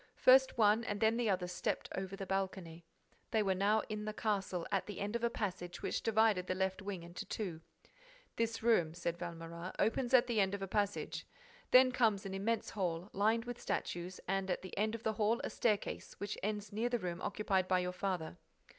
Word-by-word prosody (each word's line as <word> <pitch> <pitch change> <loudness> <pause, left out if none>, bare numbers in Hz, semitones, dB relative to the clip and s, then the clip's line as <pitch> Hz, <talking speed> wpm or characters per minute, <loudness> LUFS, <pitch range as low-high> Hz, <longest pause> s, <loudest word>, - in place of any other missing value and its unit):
First 265 0 +6
one 215 +1 +5
and 205 -2 -3
then 220 +1 +4
the 240 -3 +1
other 185 -2 +1
stepped 180 0 -2
over 190 0 -4
the 195 -1 -5
balcony. 185 -3 -3 0.4
They 220 -2 +2
were 195 -1 +2
now 205 +3 +2
in 210 0 -4
the 215 - -3
castle, 195 -5 -1
at 195 - 0
the 205 - -6
end 205 +3 -2
of 235 - -2
a 235 - +3
passage 180 -5 -4
which - - -1
divided 220 -4 +3
the 185 - 0
left 190 +1 -1
wing 195 -3 -5
into 170 +1 -7
two. 180 -7 -4 0.7
"This 230 -1 -1
room," 175 -9 +3
said 170 0 -3
Valméras, 170 +1 -6
"opens 245 +3 +2
at 250 0 +6
the 235 -3 0
end 195 +1 +1
of 195 - -5
a - - -3
passage. 205 +1 -1 0.4
Then 255 0 +7
comes 220 -6 +2
an 195 - -4
immense 210 +3 -1
hall, 180 -2 -2
lined 220 +4 +2
with 245 0 -6
statues, 175 +1 -3
and 195 0 0
at 180 - -1
the 185 - -7
end 215 +2 0
of 230 - -8
the 220 - +1
hall 220 +2 +2
a - - -3
staircase 210 -3 -1
which 205 - -3
ends 210 0 -3
near 225 +3 0
the 245 - +1
room 180 -4 -4
occupied 190 -3 0
by 185 - +3
your 180 0 -1
father." 180 - -3
200 Hz, 210 wpm, -35 LUFS, 185-220 Hz, 0.7 s, Then